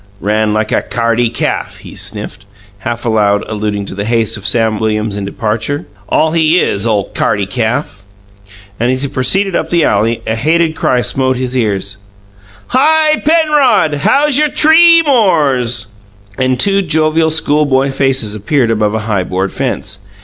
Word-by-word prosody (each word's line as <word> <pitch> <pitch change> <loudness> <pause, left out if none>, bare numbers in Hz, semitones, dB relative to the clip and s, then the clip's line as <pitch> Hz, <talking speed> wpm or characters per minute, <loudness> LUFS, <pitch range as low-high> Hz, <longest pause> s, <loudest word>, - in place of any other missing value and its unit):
"Ran 105 +1 0
like 110 0 -1
a - - +1
c'ardy 115 0 0
calf!" 115 - -3
he - - -12
sniffed, 105 +2 -6 0.3
half 120 +1 -5
aloud, 105 -3 +1
alluding 105 -2 -3
to - - -8
the 100 +1 -4
haste 115 0 0
of 105 -1 -2
Sam 110 -2 +1
Williams 110 -1 -1
in 100 -1 -4
departure. 110 +8 -3 0.2
"All 160 - +2
he 165 +1 +2
is, 100 - -1
ole 105 -3 -1
c'ardy 100 -1 0
calf!" 110 -3 -3 0.8
Then, 120 +2 0
as 130 +1 0
he 140 - -1
proceeded 175 +9 0
up - - -2
the 170 -2 +2
alley, 115 -2 0
a 110 - -1
hated 160 +7 +1
cry 125 -5 0
smote 130 0 -1
his 130 0 -3
ears: 105 -4 -1 0.7
"Hi, 310 +3 +2
Penrod! 300 - +2
How's 285 - +2
your 300 0 +2
tree 330 +3 +5
mores?" 135 - +1 0.4
And 130 +1 -1
two 200 +5 +3
jovial 160 -1 +1
schoolboy 145 -3 +1
faces 135 -5 0
appeared 115 +3 0
above 105 -1 0
a - - -1
high 100 -4 -1
board 95 +2 -3
fence. 100 -7 -4
120 Hz, 160 wpm, -13 LUFS, 105-160 Hz, 0.8 s, tree